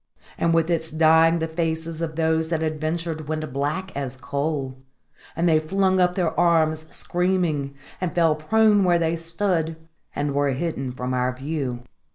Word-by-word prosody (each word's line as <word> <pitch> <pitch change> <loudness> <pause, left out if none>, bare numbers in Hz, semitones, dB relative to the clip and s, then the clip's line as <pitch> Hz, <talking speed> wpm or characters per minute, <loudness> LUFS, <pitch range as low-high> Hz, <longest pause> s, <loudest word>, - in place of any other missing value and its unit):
And 170 - +1
with 165 0 +2
its 160 -1 -1
dying 160 +1 +4
the 160 -1 -1
faces 160 0 -2
of 160 -2 -3
those 160 0 +1
that 165 -1 -1
had 155 -1 -2
ventured 160 -1 -3
went 155 -3 -3
black 150 +8 -2
as 135 -2 -4
coal; 140 0 -3 0.6
and 170 +2 +1
they 160 -2 +4
flung 190 +4 +1
up 180 0 +3
their 175 -4 0
arms, 160 -2 +2
screaming, 175 -6 -1 0.3
and 180 -3 -2
fell 165 -3 +4
prone 210 +6 +3
where 175 -2 +4
they 165 0 0
stood, 165 -1 -1 0.4
and 145 -1 -1
were 140 -1 +1
hidden 135 -3 -3
from 125 0 -4
our 125 0 +1
view. 130 -2 -4
160 Hz, 170 wpm, -23 LUFS, 145-170 Hz, 0.6 s, dying